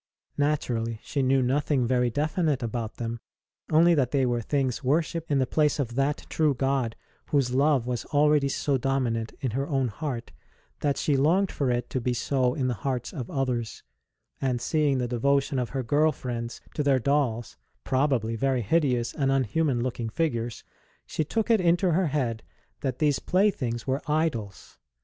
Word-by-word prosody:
Naturally, 120 -6 0
she 140 - -2
knew 130 0 +3
nothing 135 0 +1
very 125 0 +2
definite 150 - 0
about 115 -1 -3
them, 115 0 -4 0.5
only 170 +2 +5
that 135 -6 +2
they 135 -1 +2
were 120 -1 0
things 135 +1 -1
worshipped 160 +4 0
in 145 - +2
the 130 - +2
place 150 +4 +1
of 125 -5 -2
that 140 +3 0
true 155 -3 +1
God 135 -3 0 0.3
whose 135 -4 +1
love 140 -2 +3
was 125 -1 -2
already 150 -1 +3
so 135 0 0
domin 135 -2 0
ant 115 -1 -4
in 130 -4 -1
her 135 +5 -2
own 135 -5 0
heart 120 +2 -5 0.5
that 145 -2 0
she 145 - +1
longed 170 +8 +3
for 140 -3 -1
it 120 -1 0
to 130 - -1
be 125 +1 0
so 130 0 +1
in 130 -3 0
the 125 - 0
hearts 125 +1 -3
of 125 -6 -5
others; 125 -4 -2 0.6
and 125 -2 0
seeing 145 +1 +1
the 125 -1 -1
devotion 135 +3 +1
of 125 - -2
her 135 -2 -3
girl 150 +6 +3
friends 120 -4 -5
to - - -1
their 140 -2 +3
dolls 130 -4 0 0.3
(probably 130 -4 +1
very 130 0 0
hideous 125 -2 +1
and 135 -3 0
unhuman 135 0 +1
looking 120 -2 -3
figures), 120 -6 -2 0.4
she 155 - -2
took 225 +9 -1
it 220 -4 +4
into 175 +1 +3
her 175 +2 +2
head 125 -6 -1 0.4
that 130 -3 -2
these 145 -2 +2
playthings 160 - 0
were 135 +2 -1
idols. 145 - -2
135 Hz, 175 wpm, -27 LUFS, 120-150 Hz, 0.6 s, only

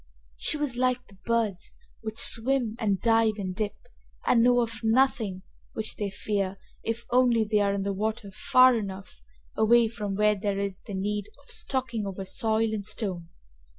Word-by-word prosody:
She 300 - 0
was 290 -5 -1
like 250 0 +1
the 195 -4 -20
birds 225 -6 -1 0.3
which 220 0 -6
swim 240 -1 +2
and 200 -4 +1
dive 225 -2 +3
and 185 -3 -4
dip, 210 0 -2 0.5
and 230 - +4
know 245 +1 +5
of 230 -1 -3
nothing 220 -5 +2 0.3
which 220 -1 -3
they 205 -1 -2
fear 195 -1 -2 0.2
if 230 +1 -3
only 245 -2 +4
they 210 0 +1
are 200 -1 +2
in 195 - -2
the 200 0 -1
water 215 +1 -3
far 255 +5 +5
enough 195 -3 -6 0.3
away 230 +1 +5
from 210 -4 -4
where 210 +1 +4
there 200 -1 -2
is 200 -1 -3
the 205 - -7
need 205 +1 -2
of 280 - -14
stalking 245 -6 -2
over 195 0 -5
soil 220 +2 +1
and 210 -2 -3
stone. 180 -8 -3
220 Hz, 175 wpm, -27 LUFS, 200-235 Hz, 0.5 s, know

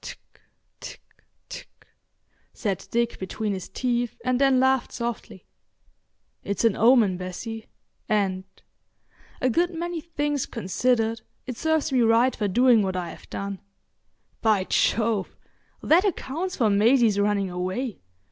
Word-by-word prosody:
"Tck—tck—tck," - - -13 0.9
said 200 -6 -3
Dick 235 0 -1
between 205 +2 -3
his 190 -2 -6
teeth, 240 +2 -2
and 255 +1 +1
then 270 -2 +4
laughed 265 -1 +2
softly. 230 -4 -5 1.0
"It's 200 +3 -1
an 225 - +3
omen, 225 -5 +4
Bessie, 215 +5 -6 0.4
and—a 195 +5 -4
good 345 +7 +1
many 345 -1 -3
things 295 -4 -2
considered, 225 +2 0 0.2
it 255 - -5
serves 315 +2 0
me 255 -2 +3
right 230 +3 +4
for 210 - -1
doing 240 +2 +4
what 190 -2 -1
I 175 -2 -3
have - - -14
done. 200 -1 -5 0.8
By 215 -4 +3
Jove! 215 0 0 0.5
that 340 +4 +5
accounts 365 -2 -2
for 220 -4 +2
Maisie's 220 0 +4
running 200 -2 +1
away. 185 +5 -3
230 Hz, 120 wpm, -25 LUFS, 200-260 Hz, 1.0 s, that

